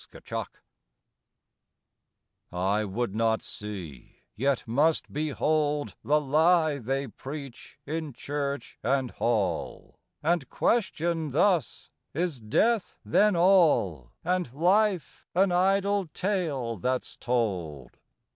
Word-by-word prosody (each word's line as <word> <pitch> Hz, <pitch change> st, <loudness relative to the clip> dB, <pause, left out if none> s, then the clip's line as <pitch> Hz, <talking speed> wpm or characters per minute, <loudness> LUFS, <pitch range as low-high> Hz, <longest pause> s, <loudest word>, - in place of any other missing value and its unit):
WHEREFORE -, -, -5 dB, 2.0 s
I 95 Hz, +4 st, 0 dB
would 105 Hz, +1 st, -2 dB
not 110 Hz, 0 st, +1 dB
see, 95 Hz, -11 st, -7 dB
yet 135 Hz, +1 st, 0 dB
must 150 Hz, +8 st, +1 dB
behold 150 Hz, 0 st, 0 dB
The 150 Hz, +2 st, +3 dB
lie 155 Hz, +1 st, +3 dB
they 135 Hz, +3 st, -2 dB
preach 135 Hz, +3 st, -9 dB
in 155 Hz, 0 st, -3 dB
church 140 Hz, +1 st, -4 dB
and 130 Hz, +1 st, 0 dB
hall; 105 Hz, -8 st, -2 dB, 0.2 s
And 160 Hz, -4 st, +1 dB
question 170 Hz, -8 st, 0 dB
thus, 165 Hz, -, +1 dB, 0.2 s
Is 165 Hz, -4 st, -1 dB
death 205 Hz, -, +1 dB
then 210 Hz, -2 st, +4 dB
all, 160 Hz, -, +3 dB
And 180 Hz, -6 st, 0 dB
life 185 Hz, -, +1 dB
an 190 Hz, +1 st, +4 dB
idle 195 Hz, +1 st, +2 dB
tale 155 Hz, -, -2 dB
that's 125 Hz, +6 st, -2 dB
told? 90 Hz, -, -2 dB
145 Hz, 100 wpm, -27 LUFS, 115-175 Hz, 2.0 s, then